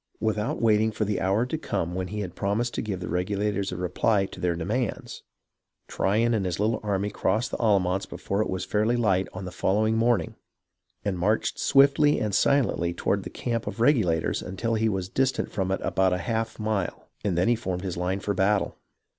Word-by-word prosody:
Without 110 0 -1
waiting 110 -1 +3
for 110 - -1
the 100 -1 -1
hour 100 +5 +2
to 155 +5 -3
come 90 - -2
when 90 0 -2
he 105 +2 -4
had 90 -4 -5
promised 110 +5 -1
to - - -2
give 100 -4 -4
the 90 - -4
Regulators 100 +3 -1
a 90 - -4
reply 95 +3 +1
to 95 - -10
their 90 -1 0
demands, 105 +8 -3 0.7
Tryon 115 +4 +1
and 110 -3 +1
his 90 -1 -2
little 110 +2 +1
army 105 -1 -1
crossed 110 +5 0
the - - -2
Allamance 95 -4 +2
before 100 +2 -2
it - - -1
was 95 0 -2
fairly 105 +5 +1
light 95 -5 +2
on 95 +1 -7
the 90 - -6
following 110 +3 +1
morning, 115 0 +1 0.7
and 95 -3 -1
marched 110 +4 0
swiftly 140 +2 +5
and 105 -2 -1
silently 105 -12 +2
toward - - 0
the - - -7
camp 115 -2 -3
of - - -4
the 115 - +1
Regulators 105 - +2
until 115 +5 -3
he 110 0 +2
was 95 -3 -2
distant 130 +6 0
from 95 -3 -1
it 95 - 0
about 95 -1 +2
a - - +1
half 115 -1 -2
mile, 105 -4 -2 0.2
and 95 -5 0
then 90 - +2
he 120 - +4
formed 95 -5 -4
his 95 -3 -3
line 90 +2 -1
for 100 +1 -2
battle. 100 +2 +1
105 Hz, 205 wpm, -26 LUFS, 95-110 Hz, 0.7 s, swiftly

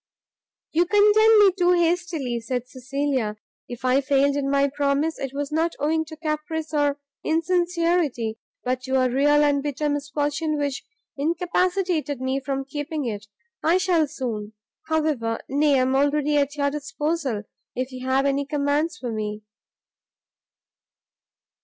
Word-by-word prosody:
"You 340 +2 +2
condemn 425 +2 +6
me 400 -2 +7
too 360 -1 +2
hastily," 335 -8 0
said 245 +1 -3
Cecilia; 260 -4 -2 0.3
"if 245 +1 -7
I 255 +2 +4
failed 280 0 +2
in 280 -1 -1
my 280 0 +3
promise, 285 +3 0
it 270 -2 -3
was 285 +1 -4
not 325 +2 0
owing 315 +2 0
to 315 0 -10
caprice 310 0 -3
or 290 -1 +1 0.2
insincerity, 335 -8 0 0.2
but 255 0 -1
to 260 +1 -2
a 255 -1 +2
real 290 +3 +4
and 285 -1 +2
bitter 295 +1 -2
misfortune 290 +2 -1
which 285 -2 -2 0.3
incapacitated 345 0 0
me 260 +1 -1
from 270 0 -3
keeping 290 +1 -4
it. 210 -2 -4 0.4
I 335 +3 +4
shall 350 -4 +2
soon, 225 -7 -5 0.3
however, 300 -8 0
nay, 285 +1 +3
I 255 - +3
am 260 +1 +1
already 290 +1 +2
at 285 0 +1
your 280 -1 0
disposal, 290 -4 -2 0.3
if 255 +1 -3
you 255 0 -8
have 265 +1 +2
any 280 0 0
commands 295 +2 0
for 245 -4 -4
me." 215 -1 -4
285 Hz, 145 wpm, -24 LUFS, 265-320 Hz, 0.4 s, me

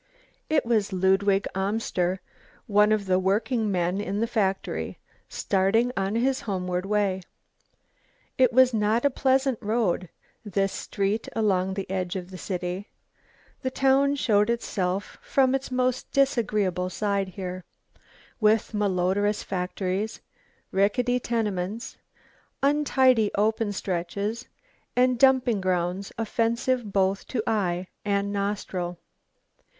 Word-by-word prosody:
It 310 -4 +2
was 220 -3 +1
Ludwig 195 +2 +2
Amster, 190 -2 -1 0.4
one 210 0 +4
of 215 -2 +1
the 185 -1 +2
working 210 +3 +1
men 180 +1 0
in 200 0 -2
the 230 - +2
factory, 200 -5 -1 0.3
starting 205 +5 +1
on 195 +2 -1
his 260 +3 +1
homeward 180 -2 -2
way. 200 -2 +1 1.1
It 255 -2 +4
was 255 0 +5
not 220 +3 +1
a 285 - +4
pleasant 265 -1 +1
road, 210 -5 0 0.3
this 195 -2 0
street 205 +2 -2
along 190 -4 +1
the 195 - -4
edge 185 -1 -2
of 185 0 -5
the 185 - -7
city. 180 +1 -4 0.7
The 260 - -1
town 270 +2 +3
showed 210 -6 +2
itself 200 -5 -2
from 265 -1 +2
its 270 0 -2
most 255 0 -1
disagreeable 215 -9 +1
side 200 0 -1
here, 185 0 -6 0.8
with 215 0 +2
malodorous 205 0 +1
factories, 190 +2 -3 0.5
rickety 245 +6 +2
tenements, 215 -3 -2 0.7
untidy 265 -6 +3
open 215 +1 +1
stretches 200 +5 -3 0.5
and 250 -1 +3
dumping 255 -5 +4
grounds 185 +1 -1
offensive 230 +1 0
both 195 0 +1
to 230 -5 -2
eye 185 -4 0 0.2
and 200 0 0
nostril. 195 -3 -2
205 Hz, 115 wpm, -26 LUFS, 190-235 Hz, 1.1 s, was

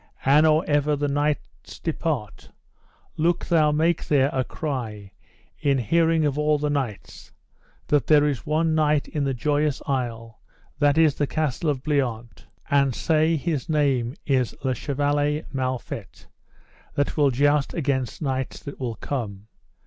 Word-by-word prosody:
And 150 +4 +5
or 155 +1 +3
ever 145 0 +2
the 145 0 -1
knights 145 +1 -2
depart, 155 - -3 0.7
look 170 +2 +1
thou 155 -3 +3
make 160 +2 +1
there 140 -1 +3
a 130 - +1
cry, 115 -10 -5 0.5
in 140 -2 +2
hearing 165 +5 +2
of 145 0 0
all 150 0 +2
the 145 0 -1
knights, 130 -8 -4 0.5
that 145 -4 +1
there 150 -1 +5
is 140 -5 -2
one 160 +1 +1
knight 150 -2 +2
in 150 -3 -2
the 135 -1 -1
Joyous 145 +2 0
Isle, 115 -4 -3 0.4
that 145 0 +3
is 160 -3 +5
the 145 - -1
Castle 155 0 -1
of 135 -3 -2
Bliant, 120 -6 -2 0.2
and 140 -3 +3
say 160 0 +2
his 155 0 -2
name 135 -5 +1
is 130 -4 +1
Le 130 -1 +1
Chevaler 145 +3 0
Mal 130 -1 -1
Fet, - - -9 0.7
that 145 - 0
will 145 -2 +4
joust 145 +2 +1
against 135 -3 -2
knights 130 -2 -2
that 140 - -9
will 120 -4 -3
come. 105 -7 -5
145 Hz, 150 wpm, -24 LUFS, 130-150 Hz, 0.7 s, And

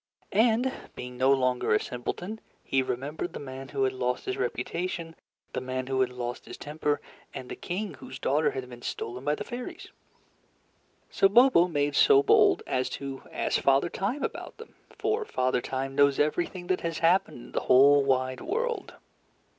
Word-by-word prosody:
And 230 +4 +3 0.2
being 125 0 -7
no 130 +2 +3
longer 125 -4 +2
a - - +3
simpleton, 180 - -5 0.2
he 135 - +1
remembered 140 +7 -4
the - - -6
man 135 -1 -8
who 135 -2 -1
had 130 0 +1
lost 125 -1 -2
his 130 - -2
reputation, 165 +7 -3 0.4
the - - -2
man 130 0 -3
who 130 0 0
had 130 - +2
lost 125 -1 -5
his - - -9
temper, 150 0 -2 0.4
and 125 - -7
the - - -5
king 195 +3 -4
whose 130 - -10
daughter 145 +4 +2
had 130 -1 -5
been 120 -1 -11
stolen 125 +2 -5
by 150 +1 +1
the 210 - -5
fairies. 245 +3 -7 1.2
So 195 - +4
Bobo 235 -5 +6
made 145 -3 0
so 415 -1 +6
bold 420 -3 +5
as 130 0 -1
to 135 -1 -6
ask - - 0
Father 135 +5 +3
Time 245 +12 -2
about - - -5
them, 455 - -12 0.2
for 435 +1 -1
Father 130 - 0
Time 135 +1 -3
knows 140 0 +4
everything 175 +4 0
that 185 0 0
has 165 -1 -2
happened 175 0 +2
in 120 - -12
the - - 0
whole 140 +2 +7
wide 130 -1 0
world. 460 +1 -2
145 Hz, 180 wpm, -28 LUFS, 130-195 Hz, 1.2 s, whole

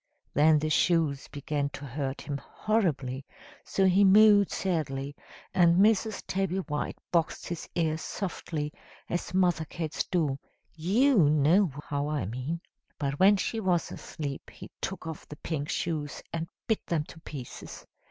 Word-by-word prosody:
Then 155 +2 +5
the 155 +1 -1
shoes 155 -4 +2
began 145 0 -2
to 140 - -7
hurt 135 +1 -3
him 140 -1 -4
horribly, 145 - -1 0.4
so 195 - +1
he 190 +2 +5
mewed 205 0 +7
sadly; 145 -6 -2 0.4
and 170 -1 +5
Mrs. 215 +1 +3
Tabby 190 -1 -1
White 150 -6 -3
boxed 170 -2 0
his 170 -2 -5
ears 160 -2 0
softly 160 -5 -4 0.4
as 175 0 -2
mother 175 -4 +3
cats 155 0 -3
do; 150 -6 0 0.4
you 195 - +4
know 155 +5 +4 0.2
how 145 0 -1
I 150 -6 -1
mean! 130 - -4 0.4
But 140 -1 -2
when 200 +2 +7
she 225 +4 -1
was 180 -5 +1
asleep 140 -3 -6
he - - -11
took 190 - -4
off 160 -2 -7
the 150 - -8
pink 150 -1 -4
shoes 155 -4 -2
and 165 0 -2 0.2
bit 220 - 0
them 160 -3 +1
to 160 - -13
pieces. 140 -6 -8
160 Hz, 150 wpm, -29 LUFS, 145-190 Hz, 0.4 s, mewed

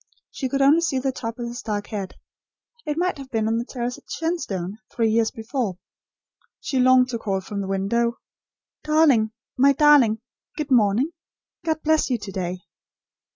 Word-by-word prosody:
She 265 - -3
could 275 +1 +1
only 295 +5 +5
see 315 -5 0
the 265 +1 0
top 230 -3 -5
of 240 - -4
his 240 +1 -6
dark 205 -2 -3
head. 195 -3 -5 0.7
It 300 0 -1
might 360 -3 0
have 270 -1 -9
been 220 -3 0
on 225 +1 +1
the 235 - -3
terrace 245 -1 -4
at - - -30
Shenstone, 215 - -3
three 225 -2 +1
years 225 0 +3
before. 225 -4 -3 0.8
She 265 - -2
longed 255 0 +5
to 235 -2 -3
call 195 -3 -1
from 200 +1 -5
the 195 - -4
window; 235 +5 0 0.7
"Darling 305 -8 +4 0.3
my 275 +2 +5
Darling! 275 -7 +5 0.4
Good 300 -3 -4
morning! 235 +5 +3 0.5
God 315 -1 -1
bless 315 -1 +2
you 250 - +1
to 205 -2 -8
day." 180 -1 -4
240 Hz, 175 wpm, -23 LUFS, 215-280 Hz, 0.8 s, only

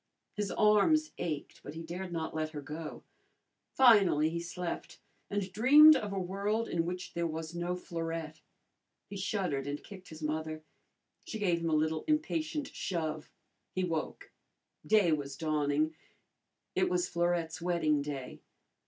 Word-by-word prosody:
His 210 -1 -2
arms 220 +10 +4
ached, 155 -4 -4
but 145 - -9
he 165 - -6
dared 180 +2 -6
not 165 -2 -3
let 155 0 -1
her 145 - -5
go. 155 +2 -7 0.7
Finally 200 - +6
he 170 - -2
slept, 170 +1 -5 0.3
and 200 -2 -2
dreamed 295 +8 +8
of 210 -6 -2
a 195 - -3
world 200 +5 -1
in 165 0 -1
which 180 +1 -5
there 170 0 0
was 160 +1 -5
no 175 +1 -2
Florette. 165 -3 -5 0.6
He 205 - -9
shuddered 185 -8 -1
and 145 +1 -4
kicked 190 -2 -11
his 155 0 -10
mother. 155 +1 -3 0.6
She 220 - -5
gave 180 -5 +1
him 165 0 -1
a 155 - +2
little 155 +1 +1
impatient 310 -1 0
shove. 155 -4 -3 0.5
He 185 - 0
woke. 165 -3 -3 0.5
Day 210 -6 +4
was 140 -3 -2
dawning. 155 0 +1 0.8
It - - +2
was 180 0 +1
Florette's 170 -2 -1
wedding 165 -4 +1
day. 140 -3 -6
170 Hz, 150 wpm, -32 LUFS, 155-195 Hz, 0.8 s, dreamed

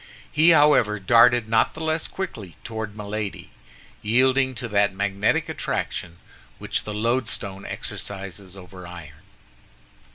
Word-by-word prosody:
He, 160 +3 +5
however, 145 -10 +5
darted 120 +3 +5
not 110 0 +2
the - - -8
less 160 0 -1
quickly 110 - -6
toward 110 -3 -6
Milady, 105 -1 -5 0.5
yielding 130 +4 +2
to 120 +1 -5
that 100 -2 +2
magnetic 100 +1 0
attraction 85 -1 -4 0.4
which - - -3
the 105 - -4
loadstone 105 -4 -2
exercises 95 -1 -6
over 90 -1 -11
iron. 80 -4 -11
105 Hz, 120 wpm, -24 LUFS, 95-125 Hz, 0.5 s, He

